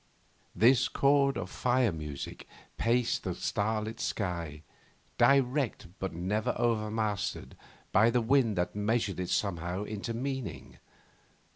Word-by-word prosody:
This 120 Hz, +3 st, +5 dB
chord 140 Hz, 0 st, +3 dB
of 90 Hz, -1 st, -5 dB
fire 125 Hz, -2 st, +2 dB
music 75 Hz, -4 st, -7 dB, 0.3 s
paced 120 Hz, +1 st, +1 dB
the -, -, -3 dB
starlit 110 Hz, +2 st, -2 dB
sky, 85 Hz, -6 st, -3 dB, 0.6 s
directed, 135 Hz, -, +2 dB
but 95 Hz, -, -2 dB
never 95 Hz, +6 st, -1 dB
overmastered, 110 Hz, -3 st, -1 dB, 0.4 s
by 110 Hz, +2 st, +5 dB
the 120 Hz, +1 st, +2 dB
wind 120 Hz, -2 st, +3 dB
that 90 Hz, +3 st, -1 dB
measured 105 Hz, -2 st, 0 dB
it 90 Hz, -, -3 dB
somehow 90 Hz, -1 st, -1 dB
into 110 Hz, +2 st, -4 dB
meaning. 130 Hz, -, -5 dB
110 Hz, 115 wpm, -30 LUFS, 95-120 Hz, 0.6 s, This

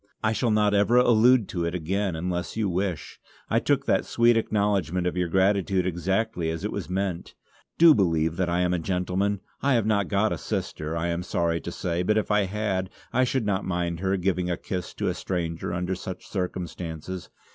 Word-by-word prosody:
I 110 Hz, 0 st, +2 dB
shall 120 Hz, +1 st, 0 dB
not 105 Hz, -1 st, +3 dB
ever 105 Hz, +4 st, +4 dB
allude 120 Hz, -1 st, +5 dB
to 85 Hz, -2 st, -2 dB
it 85 Hz, +1 st, -2 dB
again 95 Hz, +2 st, -1 dB
unless 90 Hz, +4 st, -3 dB
you 110 Hz, -2 st, +1 dB
wish. 90 Hz, -3 st, -3 dB, 0.3 s
I -, -, +4 dB
took -, -, +1 dB
that -, -, +2 dB
sweet 120 Hz, 0 st, +3 dB
acknowledgment 100 Hz, -5 st, 0 dB
of 90 Hz, -, -1 dB
your 90 Hz, -1 st, 0 dB
gratitude 95 Hz, +1 st, +2 dB
exactly 95 Hz, +1 st, -1 dB
as 80 Hz, 0 st, -4 dB
it -, -, -2 dB
was -, -, -5 dB
meant. 95 Hz, -2 st, -3 dB, 0.4 s
Do 165 Hz, -1 st, +8 dB
believe 80 Hz, -, +1 dB
that 90 Hz, -2 st, 0 dB
I 90 Hz, +1 st, +1 dB
am 90 Hz, 0 st, +1 dB
a 90 Hz, -, 0 dB
gentleman. 95 Hz, +3 st, -1 dB, 0.2 s
I 140 Hz, -1 st, +3 dB
have 115 Hz, -3 st, +2 dB
not 105 Hz, -2 st, +1 dB
got 105 Hz, +1 st, +1 dB
a -, -, -5 dB
sister, 85 Hz, -6 st, -3 dB
I 85 Hz, +1 st, -1 dB
am 85 Hz, +1 st, -1 dB
sorry 85 Hz, -1 st, -1 dB
to 85 Hz, -, -5 dB
say, 85 Hz, 0 st, -2 dB
but 105 Hz, +4 st, +2 dB
if 110 Hz, -, 0 dB
I 105 Hz, -1 st, +3 dB
had, 95 Hz, -2 st, -2 dB, 0.2 s
I 130 Hz, -, +3 dB
should 130 Hz, -2 st, 0 dB
not 100 Hz, -1 st, 0 dB
mind 85 Hz, -2 st, -2 dB
her 95 Hz, +1 st, 0 dB
giving 90 Hz, -1 st, 0 dB
a 85 Hz, -, -1 dB
kiss 90 Hz, -1 st, -5 dB
to -, -, -2 dB
a -, -, +1 dB
stranger 85 Hz, -3 st, -3 dB
under 90 Hz, +2 st, -2 dB
such 95 Hz, 0 st, -7 dB
circumstances. 90 Hz, -2 st, -5 dB
95 Hz, 205 wpm, -26 LUFS, 85-105 Hz, 0.4 s, Do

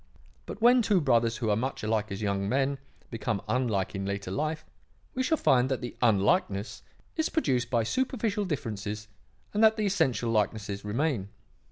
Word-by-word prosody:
But 220 Hz, -, -7 dB
when 245 Hz, +1 st, +7 dB
two 205 Hz, -4 st, +3 dB
brothers 115 Hz, -6 st, +2 dB
who 110 Hz, -2 st, 0 dB
are -, -, +3 dB
much 125 Hz, +3 st, -3 dB
alike 110 Hz, -1 st, 0 dB
as 100 Hz, +2 st, -4 dB
young 100 Hz, -1 st, 0 dB
men, 135 Hz, +2 st, +1 dB, 0.3 s
become 110 Hz, -2 st, -2 dB
unlike 110 Hz, -5 st, 0 dB
in 95 Hz, -1 st, -3 dB
later 100 Hz, -1 st, -3 dB
life, 155 Hz, +6 st, -2 dB, 0.5 s
we 260 Hz, -, -1 dB
shall 320 Hz, +5 st, +2 dB
find 130 Hz, -, +3 dB
that 130 Hz, -1 st, -1 dB
the 120 Hz, -, -6 dB
unlikeness 105 Hz, -, +1 dB, 0.4 s
is 315 Hz, -, +1 dB
produced 130 Hz, -, 0 dB
by 120 Hz, -2 st, +2 dB
superficial 225 Hz, -, -1 dB
differences 110 Hz, -, -4 dB, 0.5 s
and 210 Hz, +2 st, +2 dB
that 220 Hz, 0 st, +6 dB
the 215 Hz, -, 0 dB
essential 130 Hz, -, +1 dB
likeness 105 Hz, -2 st, -1 dB
remains. 115 Hz, -1 st, -1 dB
120 Hz, 170 wpm, -28 LUFS, 105-165 Hz, 0.5 s, when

